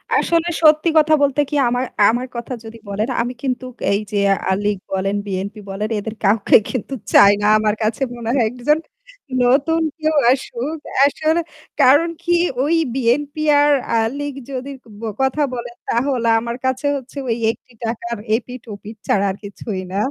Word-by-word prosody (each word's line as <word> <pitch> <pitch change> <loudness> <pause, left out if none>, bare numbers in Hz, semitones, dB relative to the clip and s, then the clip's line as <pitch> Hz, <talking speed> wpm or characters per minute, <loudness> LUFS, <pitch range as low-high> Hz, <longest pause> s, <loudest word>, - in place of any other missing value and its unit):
আসলে 335 0 +2
সত্যি 310 +2 +5
কথা 310 0 +5
বলতে 285 +1 +2
কি, 295 - -3
আমার 245 +2 0 0.2
আমার 245 +3 -1
কথা 235 +2 -5
যদি 225 +1 -10
বলেন, 210 +5 -2
আমি 245 +1 -3
কিন্তু 255 -1 -2 0.3
এই 200 - +2
যে 205 - -1 0.3
আ - - +3
লীগ 205 -1 0
বলেন, 195 +1 -1
বিএনপি 200 +2 -4
বলেন, 210 +3 -3
এদের 220 +2 -6
কাউকে 205 +1 +4
কিন্তু 255 +2 -4 0.2
চাই 200 - +8
না। - - 0
আমার 215 -1 +1
কাছে 215 +4 -1
মনে 235 -1 -5
হয়, 240 -4 +3
একজন 250 +5 +1 0.7
নতুন 290 +7 +3 0.2
কেউ 310 0 +1 0.2
আসুক। 270 +3 -2 0.3
আসলে 315 +3 +1 0.4
কারণ 290 +6 +5
কী, 345 - +1 0.3
ওই 315 +4 +2 0.2
বিএনপি 280 +5 0 0.2
আর 295 0 +4 0.2
আ - - +3 0.2
লীগের 285 -2 -5
যদি 260 +1 -5 0.5
কথা 265 +3 +1
বলেন, 240 -1 -6
তাহলে 245 -1 0
আমার 235 +1 -4
কাছে 260 +2 -1
হচ্ছে 265 +1 -11 0.3
একটি 245 +2 -17
টাকার 235 +1 -3 0.2
এপিঠ-ওপিঠ 225 -3 -7
ছাড়া 200 0 +2
আর - - -6
কিছুই 200 -1 -5
না। 195 - -3
245 Hz, 160 wpm, -19 LUFS, 220-285 Hz, 0.7 s, চাই